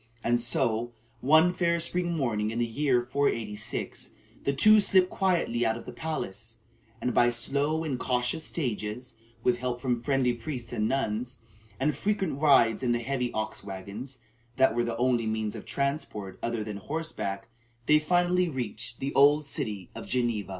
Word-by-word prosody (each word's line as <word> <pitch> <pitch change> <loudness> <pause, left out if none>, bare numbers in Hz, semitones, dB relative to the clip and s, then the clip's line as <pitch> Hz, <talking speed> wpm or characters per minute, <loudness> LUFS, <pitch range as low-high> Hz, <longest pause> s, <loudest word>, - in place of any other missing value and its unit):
And 120 +1 +2
so, 120 -1 0 0.3
one 160 +7 +5
fair 170 -2 +1
spring 175 0 -1
morning 110 -7 0
in 115 - -4
the 120 - +2
year 125 +1 +1
486, 115 -5 -2 0.4
the 140 - +3
two 215 +11 +6
slipped 190 -2 +3
quietly 175 -11 +1
out 110 0 +1
of 115 - -10
the 125 - -8
palace; 115 -6 -5 0.4
and 125 - -1
by 120 +1 +5
slow 140 +6 +1
and 140 -6 -2
cautious 125 +4 -1
stages, 120 -4 -3 0.3
with 120 -1 +2
help 125 -1 -2
from 125 -2 -1
friendly 135 -2 +1
priests 120 0 -6
and 105 0 0
nuns, 125 -1 -2 0.4
and 150 +2 +1
frequent 195 -9 -1
rides 130 -7 +5
in 125 -2 +1
the - - +2
heavy 125 0 -2
ox 110 -2 -3
wagons 100 +7 -7 0.4
that 130 -3 +4
were 120 +1 +1
the 115 -1 -3
only 120 -2 +1
means 110 -1 -1
of - - -8
transport 140 -9 -3
other 115 -2 -2
than 105 -1 -5
horseback, 115 -6 -4 0.4
they 150 0 +5
finally 175 +2 +2
reached 115 -4 -4
the 135 +1 -2
old 145 +2 +5
city 105 -8 -2
of - - -8
Geneva. 120 -5 -1
125 Hz, 165 wpm, -28 LUFS, 115-150 Hz, 0.4 s, two